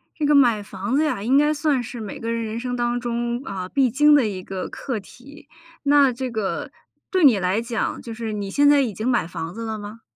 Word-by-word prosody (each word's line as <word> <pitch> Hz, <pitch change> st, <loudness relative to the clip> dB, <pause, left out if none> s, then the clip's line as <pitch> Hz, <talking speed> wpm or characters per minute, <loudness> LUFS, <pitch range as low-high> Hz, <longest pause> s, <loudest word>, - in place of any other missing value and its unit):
这 305 Hz, -, -1 dB
个 295 Hz, -, +4 dB
买 240 Hz, -6 st, +4 dB
房 200 Hz, +4 st, -4 dB
子 300 Hz, -, +3 dB
呀， 200 Hz, -9 st, -2 dB
应 255 Hz, +5 st, +3 dB
该 295 Hz, +1 st, +4 dB
算 290 Hz, -3 st, +1 dB
是 240 Hz, 0 st, -7 dB
每 210 Hz, -3 st, -7 dB
个 230 Hz, 0 st, -3 dB
人 230 Hz, 0 st, -2 dB
人 220 Hz, +1 st, -4 dB
生 245 Hz, 0 st, -3 dB
当 240 Hz, 0 st, 0 dB
中 240 Hz, 0 st, -2 dB
啊， 185 Hz, -5 st, -5 dB
必 270 Hz, -3 st, +2 dB
经 295 Hz, +5 st, +5 dB
的 280 Hz, -6 st, +4 dB
一 185 Hz, -3 st, -5 dB
个 190 Hz, -1 st, -5 dB
课 255 Hz, -6 st, -4 dB
题， 280 Hz, +8 st, -15 dB, 0.4 s
那 285 Hz, -2 st, +5 dB
这 255 Hz, +1 st, -4 dB
个 220 Hz, -4 st, -3 dB, 0.4 s
对 370 Hz, -4 st, +1 dB
你 250 Hz, -9 st, +6 dB
来 185 Hz, +4 st, 0 dB
讲， 235 Hz, -1 st, -3 dB
就 230 Hz, -, -7 dB
是 225 Hz, -1 st, -4 dB
你 205 Hz, -2 st, -4 dB
现 285 Hz, +6 st, +4 dB
在 290 Hz, -1 st, +5 dB
已 240 Hz, -6 st, -1 dB
经 215 Hz, +5 st, -4 dB
买 245 Hz, -9 st, +2 dB
房 165 Hz, 0 st, -6 dB
子 230 Hz, +2 st, -6 dB
了 220 Hz, -1 st, -4 dB
吗？ 210 Hz, +2 st, -9 dB
235 Hz, 260 characters per minute, -22 LUFS, 215-275 Hz, 0.4 s, 你